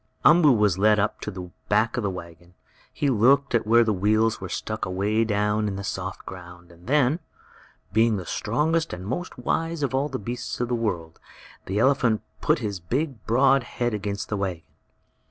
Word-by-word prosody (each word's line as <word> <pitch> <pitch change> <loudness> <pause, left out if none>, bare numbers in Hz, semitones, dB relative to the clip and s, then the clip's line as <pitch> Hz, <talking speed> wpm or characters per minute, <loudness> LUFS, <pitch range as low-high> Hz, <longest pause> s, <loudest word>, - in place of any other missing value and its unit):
Umboo 155 -3 +7
was 105 -5 +2
led 105 +1 +5
up 105 +1 -1
to - - -4
the 90 -3 -8 0.2
back - - +2
of - - -1
the 100 - -1
wagon. 85 -1 -10 0.4
He 145 -2 0
looked 130 +4 +3
at 115 -2 +1
where 115 +1 +6
the 110 -2 +1
wheels 110 +3 +1
were 95 - -5
sunk 110 +5 -4
away 100 +4 0
down 105 0 0
in 100 - -3
the 100 - -5
soft 95 -1 -5
ground, 90 -1 -11
and 85 +2 -18
then, 145 +2 +3 0.7
being 110 0 +3
the 90 - -6
strongest 160 - 0
and 90 +1 -7
most 175 - -4
wise 165 +5 -2
of 135 - -1
all 135 +3 0
the - - -3
beasts 120 +4 -5
of 120 -1 -1
the - - -1
world, 90 -9 -3 0.5
the 95 - -2
elephant 125 -2 +2 0.2
put - - +3
his 100 -4 -4
big, 125 - -3
broad 135 +4 +4
head 120 0 -3
against 100 -1 -4
the 105 - -1
wagon. 95 -4 -3
110 Hz, 190 wpm, -25 LUFS, 95-125 Hz, 0.7 s, Umboo